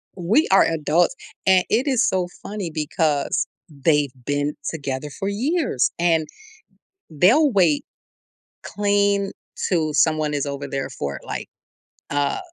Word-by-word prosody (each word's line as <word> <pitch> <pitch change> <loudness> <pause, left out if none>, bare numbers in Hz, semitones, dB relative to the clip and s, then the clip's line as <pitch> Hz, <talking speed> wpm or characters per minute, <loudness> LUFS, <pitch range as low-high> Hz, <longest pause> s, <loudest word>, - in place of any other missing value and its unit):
we 200 - +2
are 195 - +7
adults, 165 - +1 0.3
and 190 -1 +5
it 245 +7 +1
is 260 -4 +3
so 185 -2 0 0.2
funny 200 -5 -5
because 150 -2 0 0.2
they've 145 -2 +1
been 145 +1 -1 0.2
together 145 -2 -4
for 195 - -2
years 255 - 0
and 165 -2 +2 0.8
they'll 235 - +4
wait 175 -8 +3 0.8
clean 200 -1 +1 0.4
to 160 -4 +1
someone 155 -1 +2
is 145 0 -1
over 140 0 -4
there 135 0 -3
for 70 - -4
it, - - -12
like, - - -5 0.6
uh, 145 0 0
165 Hz, 130 wpm, -22 LUFS, 145-200 Hz, 0.8 s, are